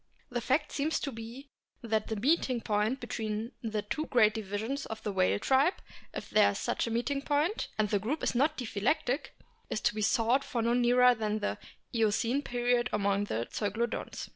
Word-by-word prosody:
The 240 Hz, -1 st, -1 dB
fact 290 Hz, +5 st, +1 dB
seems 300 Hz, +3 st, 0 dB
to 280 Hz, -, -2 dB
be 240 Hz, +4 st, -9 dB, 0.3 s
that 220 Hz, -2 st, 0 dB
the 220 Hz, -, -2 dB
meeting 255 Hz, +1 st, +2 dB
point 215 Hz, +4 st, 0 dB
between 220 Hz, -1 st, -3 dB
the 215 Hz, -3 st, -2 dB
two 310 Hz, +9 st, -3 dB
great 215 Hz, -4 st, +4 dB
divisions 220 Hz, +6 st, -3 dB
of 220 Hz, 0 st, -7 dB
the 210 Hz, -, -1 dB
whale 95 Hz, -, +2 dB
tribe, 270 Hz, -, +3 dB, 0.4 s
if -, -, -6 dB
there -, -, +6 dB
is -, -, -3 dB
such -, -, -1 dB
a -, -, -1 dB
meeting 245 Hz, +5 st, -1 dB
point, 295 Hz, +8 st, 0 dB
and 215 Hz, -1 st, +2 dB
the 205 Hz, 0 st, +1 dB
group 260 Hz, +10 st, -3 dB
is -, -, +1 dB
not 290 Hz, +5 st, +2 dB
diphyletic, 245 Hz, +4 st, 0 dB, 0.4 s
is -, -, -1 dB
to -, -, +2 dB
be 215 Hz, -, -3 dB
sought 230 Hz, +5 st, +3 dB
for 235 Hz, -4 st, -2 dB
no 235 Hz, +1 st, +2 dB
nearer 250 Hz, +1 st, +5 dB
than 215 Hz, -2 st, -2 dB
in 215 Hz, -, -1 dB
the -, -, -2 dB, 0.3 s
Eocene 230 Hz, +4 st, +1 dB
period 245 Hz, -2 st, +1 dB
among 200 Hz, -1 st, +1 dB
the 115 Hz, -, -2 dB
Zeuglodonts. 220 Hz, +3 st, -3 dB
235 Hz, 190 wpm, -30 LUFS, 215-265 Hz, 0.4 s, there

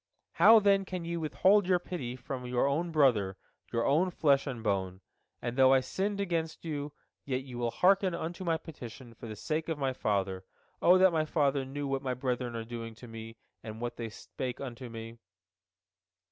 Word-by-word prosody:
How, 225 Hz, 0 st, +7 dB
then, 200 Hz, -1 st, +4 dB
can 185 Hz, -2 st, -5 dB
ye 170 Hz, 0 st, -3 dB
withhold 185 Hz, +5 st, +3 dB
your 185 Hz, -1 st, +4 dB
pity 165 Hz, -9 st, -5 dB
from 125 Hz, 0 st, -6 dB
your 125 Hz, +1 st, +1 dB
own 160 Hz, +5 st, 0 dB
brother, 115 Hz, -11 st, +3 dB, 0.3 s
your 115 Hz, 0 st, 0 dB
own 160 Hz, +7 st, +3 dB
flesh 145 Hz, -5 st, +2 dB
and 120 Hz, -5 st, -5 dB
bone? 95 Hz, -3 st, -1 dB, 0.4 s
And 120 Hz, 0 st, -2 dB
though 130 Hz, 0 st, +6 dB
I 135 Hz, -, +5 dB
sinned 200 Hz, +9 st, -2 dB
against 165 Hz, -4 st, -2 dB
you, 145 Hz, -2 st, -3 dB, 0.3 s
yet 130 Hz, -1 st, -2 dB
you 125 Hz, -2 st, -8 dB
will 120 Hz, -1 st, 0 dB
hearken 190 Hz, -, +3 dB
unto 170 Hz, +2 st, -5 dB
my 165 Hz, -2 st, +1 dB
petition 125 Hz, -6 st, -10 dB
for 115 Hz, -, -10 dB
the 110 Hz, -, -6 dB
sake 155 Hz, +9 st, -2 dB
of 160 Hz, -, -1 dB
my 135 Hz, -2 st, 0 dB
father. 95 Hz, -5 st, -1 dB, 0.4 s
O 180 Hz, +2 st, +7 dB
that 185 Hz, -1 st, +5 dB
my 155 Hz, -1 st, +2 dB
father 140 Hz, -3 st, +1 dB
knew 145 Hz, +2 st, -4 dB
what 135 Hz, -1 st, -1 dB
my 130 Hz, -2 st, -2 dB
brethren 125 Hz, -2 st, -2 dB
are 115 Hz, -1 st, -4 dB
doing 115 Hz, -1 st, -6 dB
unto 115 Hz, +3 st, -13 dB
me, 115 Hz, -1 st, -9 dB, 0.2 s
and 110 Hz, 0 st, -8 dB
what 120 Hz, 0 st, -4 dB
they 115 Hz, -1 st, -4 dB
spake 125 Hz, +3 st, -6 dB
unto 125 Hz, -2 st, -7 dB
me!" 115 Hz, 0 st, -8 dB
135 Hz, 195 wpm, -31 LUFS, 120-165 Hz, 0.4 s, How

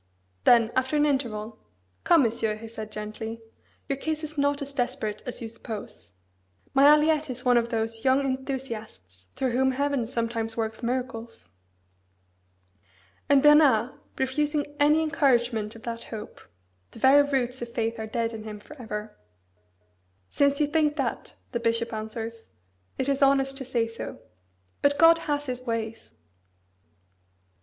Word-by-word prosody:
Then, 235 Hz, -1 st, +6 dB
after 260 Hz, +3 st, +1 dB
an 295 Hz, -, +4 dB
interval, 230 Hz, -6 st, -2 dB, 0.5 s
"Come, 335 Hz, -4 st, +6 dB
Monsieur," 220 Hz, -2 st, 0 dB
he 225 Hz, +1 st, -9 dB
said 220 Hz, -1 st, -8 dB
gently, 215 Hz, +2 st, -6 dB, 0.5 s
"your 275 Hz, -, -1 dB
case 315 Hz, +1 st, -3 dB
is 310 Hz, 0 st, -6 dB
not 285 Hz, 0 st, +1 dB
as 280 Hz, 0 st, -9 dB
desperate 245 Hz, -5 st, -2 dB
as 245 Hz, -1 st, -5 dB
you -, -, -4 dB
suppose. 220 Hz, -, -8 dB, 0.6 s
My 275 Hz, +1 st, +5 dB
Aliette 300 Hz, 0 st, +5 dB
is 250 Hz, 0 st, -6 dB
one 250 Hz, -1 st, +5 dB
of 235 Hz, 0 st, +2 dB
those 225 Hz, 0 st, -2 dB
young 265 Hz, +1 st, +4 dB
enthusiasts 235 Hz, -, -5 dB
through 260 Hz, -2 st, 0 dB
whom 265 Hz, +2 st, +2 dB
Heaven 280 Hz, -3 st, 0 dB
sometimes 230 Hz, -2 st, -3 dB
works 220 Hz, 0 st, -3 dB
miracles." 235 Hz, -, -4 dB, 1.8 s
And 280 Hz, -1 st, +5 dB
Bernard 285 Hz, -6 st, +6 dB, 0.3 s
refusing 290 Hz, +3 st, 0 dB
any 300 Hz, +2 st, +4 dB
encouragement 240 Hz, -7 st, +1 dB
of 230 Hz, -, -13 dB
that 230 Hz, 0 st, -5 dB
hope 215 Hz, -2 st, -8 dB, 0.5 s
(the -, -, -15 dB
"very 265 Hz, +5 st, +6 dB
roots 260 Hz, -3 st, -1 dB
of 240 Hz, -, -5 dB
faith 230 Hz, -1 st, -2 dB
are 220 Hz, -, -4 dB
dead" 230 Hz, +1 st, -2 dB
in 220 Hz, -1 st, -7 dB
him 215 Hz, -1 st, -7 dB
for 300 Hz, -, -13 dB
ever) 210 Hz, -1 st, -6 dB, 1.2 s
"since 280 Hz, 0 st, +2 dB
you 300 Hz, -, +4 dB
think 300 Hz, 0 st, +1 dB
that," 270 Hz, -6 st, -3 dB, 0.2 s
the 235 Hz, -, -1 dB
bishop 230 Hz, 0 st, 0 dB
answers, 225 Hz, +1 st, -6 dB, 0.5 s
"it 265 Hz, -, -1 dB
is 275 Hz, 0 st, 0 dB
honest 270 Hz, 0 st, +3 dB
to 265 Hz, -, -5 dB
say 240 Hz, -2 st, 0 dB
so. 230 Hz, 0 st, -7 dB, 0.6 s
But 285 Hz, 0 st, +3 dB
God 330 Hz, +1 st, +7 dB
has 290 Hz, 0 st, 0 dB
His 255 Hz, -2 st, -4 dB
ways!" 225 Hz, -2 st, -4 dB
245 Hz, 150 wpm, -26 LUFS, 225-280 Hz, 1.8 s, God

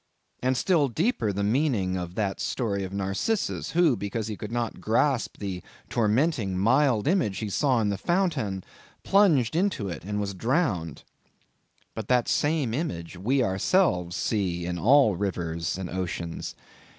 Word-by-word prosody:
And 130 Hz, 0 st, +1 dB
still 160 Hz, -1 st, +3 dB
deeper 135 Hz, -, 0 dB
the 100 Hz, +1 st, -2 dB
meaning 110 Hz, -5 st, +1 dB
of 90 Hz, -1 st, -5 dB
that 100 Hz, -3 st, -1 dB
story 100 Hz, -6 st, -1 dB
of 95 Hz, -, -5 dB
Narcissus, 100 Hz, -, -2 dB
who 165 Hz, -6 st, +4 dB
because 105 Hz, +1 st, -3 dB
he 105 Hz, -, -3 dB
could 105 Hz, +1 st, -7 dB
not 120 Hz, -1 st, -3 dB
grasp 120 Hz, +3 st, +1 dB
the 95 Hz, -3 st, -4 dB, 0.3 s
tormenting, 115 Hz, -, +1 dB
mild 120 Hz, +3 st, +3 dB
image 135 Hz, -, +1 dB
he 110 Hz, -2 st, -4 dB
saw 130 Hz, +1 st, +2 dB
in 105 Hz, -, +1 dB
the 100 Hz, -2 st, -2 dB
fountain, 140 Hz, -, 0 dB, 0.4 s
plunged 160 Hz, -, +3 dB
into 175 Hz, -, 0 dB
it 85 Hz, -, -6 dB
and 105 Hz, +2 st, -3 dB
was 100 Hz, -1 st, -2 dB
drowned. 105 Hz, -, -1 dB, 0.9 s
But 110 Hz, -2 st, -6 dB
that 125 Hz, -2 st, +2 dB
same 145 Hz, -6 st, +1 dB
image, 90 Hz, -, -3 dB
we 125 Hz, +9 st, +1 dB
ourselves 95 Hz, -, +1 dB
see 90 Hz, -5 st, -1 dB
in 90 Hz, 0 st, -3 dB
all 125 Hz, -, +5 dB
rivers 85 Hz, -3 st, -2 dB
and 95 Hz, -2 st, -4 dB
oceans. 85 Hz, -2 st, -4 dB
110 Hz, 150 wpm, -26 LUFS, 95-140 Hz, 0.9 s, all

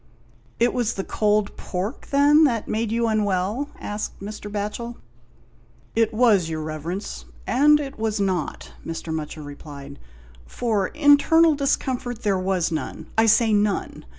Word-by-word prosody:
" -, -, -32 dB
It 240 Hz, +1 st, +3 dB
was 240 Hz, -2 st, 0 dB
the 195 Hz, -, -3 dB
cold 210 Hz, 0 st, 0 dB
pork, 195 Hz, +7 st, -5 dB
then, 290 Hz, +2 st, +5 dB
that 235 Hz, -6 st, 0 dB
made 220 Hz, 0 st, -1 dB
you 230 Hz, 0 st, +1 dB
unwell?" 210 Hz, +4 st, 0 dB
asked 210 Hz, +1 st, -5 dB
Mr. 210 Hz, +1 st, -7 dB
Batchel. 210 Hz, +3 st, -4 dB, 1.0 s
"It 225 Hz, -1 st, +3 dB
was, 215 Hz, -7 st, +3 dB
your 155 Hz, -1 st, -3 dB
Eeverence, 160 Hz, +6 st, -5 dB, 0.2 s
and 295 Hz, +3 st, +5 dB
it 275 Hz, -4 st, -6 dB
was 220 Hz, -1 st, -1 dB
not," 155 Hz, -, -2 dB
Mr. 165 Hz, 0 st, -5 dB
Mutcher 155 Hz, 0 st, -5 dB
replied, 140 Hz, -1 st, -10 dB, 0.5 s
"for 215 Hz, -6 st, 0 dB
internal 310 Hz, +2 st, +5 dB
discomfort 255 Hz, -4 st, -1 dB
there 195 Hz, -3 st, +1 dB
was 185 Hz, -2 st, 0 dB
none 160 Hz, -, -5 dB
— -, -, -22 dB
I 225 Hz, 0 st, +4 dB
say 225 Hz, 0 st, +4 dB
none. 205 Hz, -1 st, 0 dB
210 Hz, 150 wpm, -23 LUFS, 185-240 Hz, 1.0 s, then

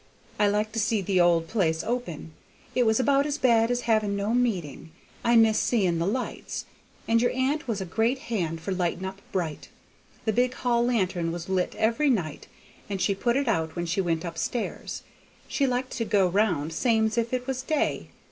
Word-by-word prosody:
I 210 Hz, -, +4 dB
like 210 Hz, +1 st, 0 dB
to 225 Hz, -, -2 dB
see 210 Hz, -1 st, +1 dB
the 185 Hz, -1 st, +2 dB
old 170 Hz, -1 st, +3 dB
place 165 Hz, -6 st, 0 dB
open; 195 Hz, -10 st, -4 dB, 0.4 s
it 250 Hz, -2 st, +2 dB
was 220 Hz, +1 st, +3 dB
about 280 Hz, +2 st, +3 dB
as 295 Hz, 0 st, -2 dB
bad 235 Hz, -5 st, +3 dB
as 245 Hz, 0 st, 0 dB
having 215 Hz, -3 st, +1 dB
no 200 Hz, +3 st, -1 dB
meeting. 190 Hz, -, -1 dB, 0.3 s
I 235 Hz, 0 st, +3 dB
miss 225 Hz, -1 st, +5 dB
seeing 185 Hz, -8 st, +1 dB
the 170 Hz, -, 0 dB
lights, 250 Hz, +5 st, -3 dB, 0.4 s
and 230 Hz, 0 st, +3 dB
your 245 Hz, -, +3 dB
aunt 265 Hz, +3 st, 0 dB
was 215 Hz, -4 st, -2 dB
a -, -, -3 dB
great 225 Hz, +8 st, +1 dB, 0.2 s
hand 165 Hz, -5 st, -1 dB
for 175 Hz, -, -4 dB
lighting 180 Hz, 0 st, -1 dB
up 195 Hz, +1 st, -6 dB
bright; 165 Hz, -5 st, -3 dB, 0.6 s
the 220 Hz, -, +1 dB
big 250 Hz, +3 st, +1 dB
hall 240 Hz, -1 st, +1 dB
lantern 185 Hz, -8 st, 0 dB
was 175 Hz, +1 st, -6 dB
lit 185 Hz, -1 st, 0 dB
every 230 Hz, +7 st, +2 dB
night, 175 Hz, -, -1 dB, 0.4 s
and 195 Hz, -1 st, -2 dB
she 200 Hz, -, +2 dB
put 235 Hz, +5 st, 0 dB
it 280 Hz, -1 st, 0 dB
out 160 Hz, -7 st, 0 dB
when 175 Hz, 0 st, -2 dB
she 185 Hz, +3 st, 0 dB
went 165 Hz, -2 st, -1 dB
up 165 Hz, -1 st, -5 dB
stairs. 240 Hz, +7 st, -3 dB, 0.4 s
She 275 Hz, -, +1 dB
liked 255 Hz, 0 st, -1 dB
to 235 Hz, -, 0 dB
go 200 Hz, -3 st, +3 dB
round 175 Hz, -5 st, +1 dB
same's 220 Hz, 0 st, +2 dB
if 235 Hz, 0 st, 0 dB
it 250 Hz, -1 st, -2 dB
was 260 Hz, -1 st, -2 dB
day. 300 Hz, +3 st, -1 dB
215 Hz, 200 wpm, -26 LUFS, 180-245 Hz, 0.6 s, miss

